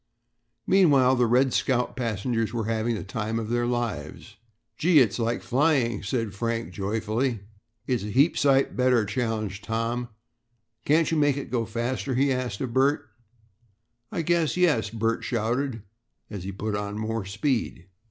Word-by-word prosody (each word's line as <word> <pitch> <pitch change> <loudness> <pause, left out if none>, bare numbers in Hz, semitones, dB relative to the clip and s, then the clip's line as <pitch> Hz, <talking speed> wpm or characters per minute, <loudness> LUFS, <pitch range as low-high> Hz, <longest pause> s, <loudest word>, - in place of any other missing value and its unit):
Meanwhile 140 -9 +4
the 120 -1 +3
"Red 125 +2 +3
Scout's" 125 -2 +1
passengers 115 -1 -1
were 115 -1 -2
having 115 +1 0
the - - -5
time 110 +3 -3
of 110 -1 -3
their 120 0 +1
lives. 115 - -4 0.4
"Gee, 165 +6 +3
it's 120 -5 +4
like 115 +1 -1
flying," 130 -5 +1
said 110 0 -2
Frank 115 -1 -3
joyfully. 110 +4 -1 0.4
"It's 125 -3 0
a 105 - -5
heap 140 +10 +3
sight 135 -1 +2
better," 125 -3 +3
challenged 110 -2 -3
Tom. 115 +3 -2 0.8
"Can't 160 +2 +3
you 165 - +1
make 145 -2 +3
it 140 - -6
go 115 -3 0
faster?" 120 +3 -2
he 135 +1 +2
asked 125 -5 -3
of 125 -3 -3
Bert. 135 +3 +2 1.0
"I 165 - -2
guess 170 0 +1
yes," 165 -11 +2
Bert 115 0 -1
shouted, 120 0 -1 0.5
as 100 -4 -6
he 95 - -4
put 105 +2 -3
on 105 0 -4
more 110 0 -2
speed. 110 - -2
120 Hz, 155 wpm, -26 LUFS, 110-130 Hz, 1.0 s, Meanwhile